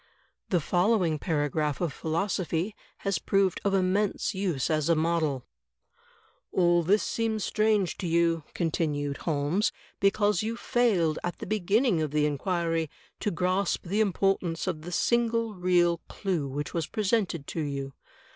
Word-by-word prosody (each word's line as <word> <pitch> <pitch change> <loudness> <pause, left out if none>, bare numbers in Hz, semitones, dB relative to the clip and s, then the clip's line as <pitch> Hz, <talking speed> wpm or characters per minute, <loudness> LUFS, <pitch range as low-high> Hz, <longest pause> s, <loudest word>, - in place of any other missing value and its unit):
The 180 - +3
following 180 -1 +2
paragraph 150 -2 0
of 170 -5 -1
philosophy 175 +3 -1 0.3
has 195 -1 +1
proved 195 -2 +1
of 200 -1 +2
immense 195 +3 +1
use 185 -8 -1
as 155 0 +1
a 170 - +5
model: 155 -5 0 1.1
"All 175 -1 +3
this 195 +6 +3
seems 220 -2 -1
strange 215 -4 +1
to 180 - -2
you," 165 -1 +2
continued 150 -4 -1
Holmes, 160 +6 0 0.3
"because 205 -1 +2
you 225 +2 -3
failed 195 -13 +1
at 175 - -3
the - - -6
beginning 210 0 +2
of 155 - -1
the 150 +1 +1
inquiry 165 +1 -1 0.3
to - - 0
grasp 185 +2 0
the 200 +5 +1
importance 190 -4 +1
of 175 -5 -2
the 175 +3 -7
single 230 +2 +1
real 175 -2 +2
clew 180 -8 -2
which 140 +1 -4
was 165 -2 -1
presented 195 -7 0
to 165 - -3
you. 140 -2 -4
175 Hz, 145 wpm, -28 LUFS, 160-200 Hz, 1.1 s, a